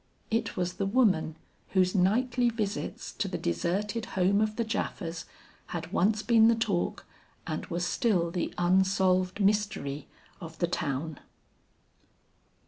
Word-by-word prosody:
It 225 0 -1
was 180 -1 -1
the 195 +1 -2
woman 195 -9 +2 0.4
whose 185 -1 +3
nightly 240 +6 +2
visits 215 -3 -3
to - - -2
the - - -3
deserted 200 - -1
home 195 +3 +3
of 215 0 0
the 235 - -1
Japhas 170 -6 -3 0.4
had 165 +1 -6
once 215 +3 +2
been 225 -2 +5
the 230 - +5
talk 215 -6 -1 0.4
and - - -4
was 175 -2 -2
still 180 -6 +1
the 175 0 -2
unsolved 185 +1 +2
mystery 195 -9 0 0.3
of 160 -1 -9
the 175 - +2
town. 155 -2 -3
190 Hz, 135 wpm, -29 LUFS, 175-215 Hz, 0.4 s, been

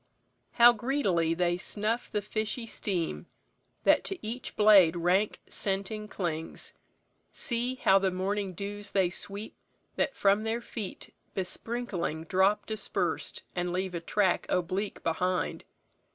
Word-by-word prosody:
"How 240 0 +8
greedily 205 - +1
They 175 0 +1
snuff 215 +5 -1
the 210 -2 -1
fishy 215 +3 -3
steam, 185 -7 -2 0.6
that - - +5
to 390 - -3
each 235 +4 -5
blade 200 -6 +7
Rank 180 +5 +1
scenting 200 +2 -2
clings! 165 -6 -4 0.6
See! 245 +1 0
how 195 -6 +4
the 195 0 +2
morning 190 +1 -2
dews 205 +2 -5
They 190 -3 +3
sweep, 200 +3 -3 0.4
that - - +1
from 200 +1 +3
their 225 +1 -1
feet 220 -4 -7 0.2
besprinkling 185 -4 -3
drop 190 +4 +2
Dispersed, 215 -1 -2
and 175 -1 -1
leave 185 +1 -2
a 170 - -3
track 190 +1 +1
oblique 185 +3 -1
behind. 180 +2 -1
200 Hz, 125 wpm, -29 LUFS, 180-215 Hz, 0.6 s, How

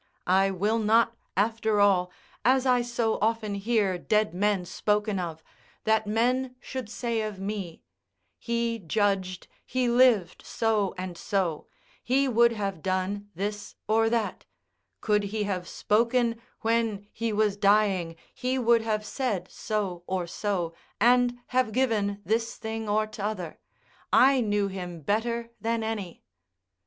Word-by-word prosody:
I 190 +2 +4
will 205 +4 0
not, 230 +2 +3 0.2
after 220 0 +1
all, 185 -3 +3 0.3
as 260 +3 +3
I 250 -2 +3 0.4
often 220 -1 0
hear 200 -3 0
dead 210 +1 +1
men 195 0 +1
spoken 210 +2 0
of, 165 -3 -5 0.4
that 220 -1 +2
men 250 +4 +1
should 255 -3 -6
say 235 -1 -2
of 215 -3 -4
me: 195 -4 -5 0.6
"He 235 -1 -1
judged, 190 0 -1 0.2
he 255 -1 -1
lived 235 -8 +3
so 215 -4 0
and 185 -1 -5
so; 180 -6 -1 0.4
he 270 +3 +2
would 235 -1 +4
have 200 -6 -3
done 190 +3 -2
this 205 +3 -4
or 225 +1 +3
that; 230 -2 -1 0.6
could 210 -2 +2
he 210 +1 -2
have 185 -3 -3
spoken 230 +1 +1 0.2
when 225 -3 0
he 230 -1 -2
was 210 -1 +2
dying, 200 -4 +2 0.2
he 255 +1 -1
would 235 -2 +4
have 215 -1 -1
said 210 -6 -2
so 200 -5 -3
or 185 -2 -1
so, 175 -2 -2 0.3
and 245 0 +4
have 255 -3 +1
given 210 -5 0
this 230 +1 0
thing 220 -1 -5
or 215 +1 +2
t'other; 210 -5 -5 0.5
I 265 0 +6
knew 205 -2 +1
him 180 -3 -6
better 230 +6 -1
than 230 0 0
any." 210 -6 -5
215 Hz, 135 wpm, -27 LUFS, 195-230 Hz, 0.6 s, I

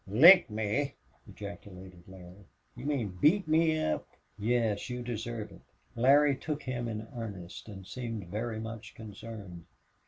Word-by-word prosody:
"Lick 160 - +9
me!" 110 +6 -1 0.3
ejaculated 95 -3 -10
Larry. 95 0 -13 0.3
"You - - -8
mean 110 -11 -2
beat 185 +4 +4
me 160 0 +3
up?" 75 - -1 0.3
"Yes. 110 +1 0
You 125 0 -4
deserve 115 -2 -4
it." - - -14 0.3
Larry 140 +4 +5
took 150 +2 -4
him 120 -2 -3
in 110 -1 -4
earnest 100 -4 -7
and 95 -2 -9
seemed 115 -3 -5
very 110 +3 -3
much 115 0 -7
concerned. 105 -5 -9
115 Hz, 135 wpm, -31 LUFS, 100-130 Hz, 0.3 s, Lick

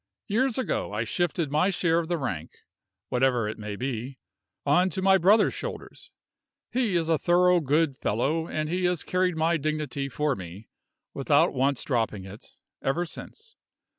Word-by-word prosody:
Years 240 +3 +1
ago 255 - -2
I 105 +2 -1
shifted 170 +3 -1
my 155 +6 +3
share 170 -3 +1
of 165 - -3
the 175 0 0
rank 90 - -4 0.6
(whatever 125 -3 +2
it 105 - -5
may 105 -1 -5
be) 125 +2 -4 0.5
on 180 +6 +4
to 185 - -4
my 190 0 +5
brother's 205 +5 +4
shoulders. - - -7 0.6
He 240 -7 0
is 165 -2 +1
a 165 -2 +2
thorough 180 0 +4
good 150 -1 +1
fellow, 150 +10 0
and 155 0 -2
he 180 +3 -1
has 180 -3 0
carried 180 -2 0
my 165 +1 +2
dignity 150 -2 -2
for 150 +1 0
me, 95 +3 -10 0.4
without 145 +4 +3
once 135 0 +1
dropping 110 -7 -1
it, 100 +3 -11 0.3
ever 165 +6 0
since. 445 - -11
155 Hz, 165 wpm, -26 LUFS, 130-180 Hz, 0.6 s, my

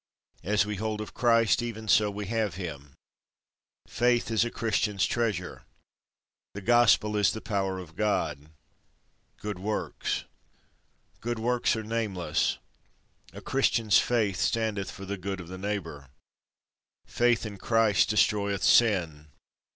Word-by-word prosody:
As 105 +2 +2
we 105 -1 -4
hold 110 +1 -3
of 110 - -7
Christ, 115 -1 +3
even 110 -2 -6
so 105 0 +4
we 105 0 -5
have 110 -4 -1
him. 75 -7 -7 0.9
Faith 120 +1 +1
is 110 0 +3
a 120 - -2
Christian's 110 -3 0
treasure. 105 -7 -2 0.9
The 105 - -5
Gospel 105 -1 +4
is 105 -3 +3
the 110 - -5
power 95 -3 -2
of 85 -3 -10
God. 80 -8 -1 0.9
Good 105 -3 -5
Works. 105 +3 -3 1.0
Good 120 0 -3
works 120 +2 +1
are 110 - -4
nameless. 110 -5 -1 0.7
A - - -10
Christian's 115 -7 +2
work 110 -6 +1
standeth 110 -4 -1
for 95 - -9
the 100 +1 -4
good 95 +1 -4
of 85 -2 -9
the 95 0 -8
neighbour. 85 -9 -5 1.0
Faith 120 -1 +1
in 105 -2 -7
Christ 115 -2 +2
destroyeth 100 -2 +1
sin. 85 -10 +3
105 Hz, 130 wpm, -28 LUFS, 95-115 Hz, 1.0 s, so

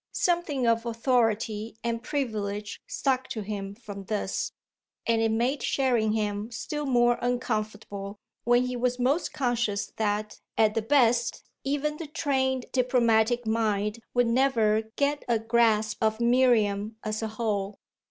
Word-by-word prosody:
Something 340 -7 0
of 230 0 +3
authority 225 -2 0
and 230 -1 -1
privilege 210 -7 -3
stuck 260 -2 0
to 225 - -4
him 200 -1 -5
from 205 -4 -9
this, 205 -1 -2 0.5
and 230 -1 +2
it 225 - +2
made 240 +5 0
Sherringham 220 -5 0
still 290 +5 -4
more 240 -2 +3
uncomfortable 215 -4 -3 0.3
when 240 +1 +4
he 250 0 -3
was 245 0 0
most 265 +7 +1
conscious 240 -6 -1
that, 210 0 -1 0.2
at 215 -1 +4
the 225 - 0
best, 235 -1 +2 0.2
even 290 +2 -1
the 330 - -6
trained 265 -4 0
diplomatic 240 -2 +2
mind 215 -1 0 0.2
would 245 0 +4
never 230 -3 +2
get 285 +1 0
a 235 -2 +3
grasp 220 -1 +2
of 220 0 +1
Miriam 230 -4 +3
as 215 0 -2
a 220 - -1
whole. 210 -3 -2
230 Hz, 135 wpm, -27 LUFS, 215-250 Hz, 0.5 s, when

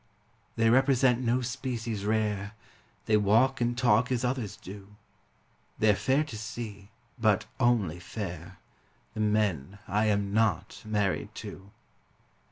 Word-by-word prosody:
They 115 0 +3
represent 130 -1 +4
no 125 +1 +1
species 120 -4 -4
rare, 105 -1 -1 0.5
They 110 - +4
walk 115 +6 +3
and 120 0 0
talk 125 0 +3
as 125 -1 0
others 125 -5 -2
do; 100 +2 -11 0.8
They're 105 -2 +4
fair 135 +9 +2
to 140 -8 -8
see 110 -3 -7 0.3
but 110 -1 +2
only 110 -9 +2
fair 90 -2 -7 0.6
The - - -7
men 105 -6 0
I 105 +4 +1
am 100 -1 0
not 110 -6 0
married 105 -3 -1
to. 95 +1 -9
110 Hz, 125 wpm, -29 LUFS, 100-120 Hz, 0.8 s, represent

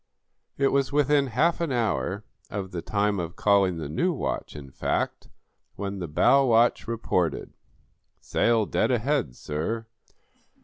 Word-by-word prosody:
It 140 -1 +3
was 140 0 +1
within 145 -1 +3
half 155 +9 +1
an 165 -4 -1
hour 110 -4 -1 0.3
of 95 -2 -5
the 85 - -4
time 100 +2 0
of 85 -1 -5
calling 100 -4 +3
the 80 -3 -4
new 175 - 0
watch, 155 - -4
in 70 -3 -9
fact, - - -2 0.5
when 100 0 -4
the 90 - -4
bow 135 - +4
watch 120 -2 +3
reported: 110 -7 -1 0.7
"Sail 115 -2 +1
dead - - 0
ahead, 125 - 0
sir!" 85 - -3
110 Hz, 140 wpm, -26 LUFS, 90-135 Hz, 0.7 s, bow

